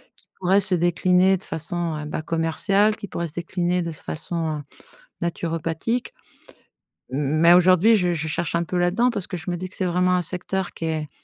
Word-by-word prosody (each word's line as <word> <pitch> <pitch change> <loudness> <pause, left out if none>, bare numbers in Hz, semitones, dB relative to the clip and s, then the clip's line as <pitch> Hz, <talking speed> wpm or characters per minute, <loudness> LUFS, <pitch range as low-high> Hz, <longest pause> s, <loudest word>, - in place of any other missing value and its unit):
qui - - -27
pourrait 190 +2 +3
se 195 -1 +5
décliner 180 +2 +3
de 185 - -7
façon, 165 +1 -3
heu, 150 - -6
ben, 150 - -4
commerciale, 170 +6 +1
qui 205 - -8
pourrait 170 -1 -4
se 150 - -5
décliner 175 +1 -1
de 170 - -4
façon 155 0 -4 0.6
naturopathique. 170 - -2 1.0
Mais 150 +5 +3
aujourd'hui, 185 +5 +5
je 180 -3 +1
je 160 -1 -3
cherche 160 +2 -2
un 170 0 +1
peu 180 +2 -3
là-dedans 190 +8 +2
parce 205 -6 -3
que 185 - -5
je 175 +2 -6
me 175 - -2
dis 185 +1 -5
que 185 - -9
c'est 190 - -2
vraiment 180 +1 +2
un 180 - 0
secteur 180 +2 -3
qui 165 - -5
est 155 -2 -2
175 Hz, 190 wpm, -23 LUFS, 165-185 Hz, 1.0 s, se